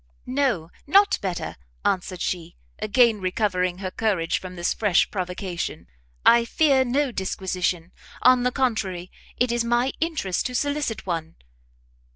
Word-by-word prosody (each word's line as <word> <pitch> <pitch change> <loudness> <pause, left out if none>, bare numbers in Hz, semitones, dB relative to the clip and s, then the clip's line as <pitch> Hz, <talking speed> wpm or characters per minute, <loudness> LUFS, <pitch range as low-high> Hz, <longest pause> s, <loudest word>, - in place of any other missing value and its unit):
"No, 250 - 0 0.2
not 400 +6 +5
better," 185 - -3 0.3
answered 185 -1 -1
she, 175 -3 -3 0.2
again 225 -1 +3
recovering 185 -2 0
her 185 -1 -4
courage 190 -7 0
from 185 -1 -8
this 175 -1 0
fresh 205 -5 +2
provocation; 180 - -4 0.4
"I 235 0 +7
fear 270 +2 +3
no 265 +2 0
disquisition; 185 -3 -2 0.3
on 255 0 +6
the 250 0 +1
contrary, 200 -9 -1 0.3
it 245 -1 +2
is 240 0 +1
my 240 +3 +1
interest 300 - -1
to 250 - -7
solicit 285 -4 -1
one." 165 -3 -3
205 Hz, 135 wpm, -24 LUFS, 180-250 Hz, 0.4 s, I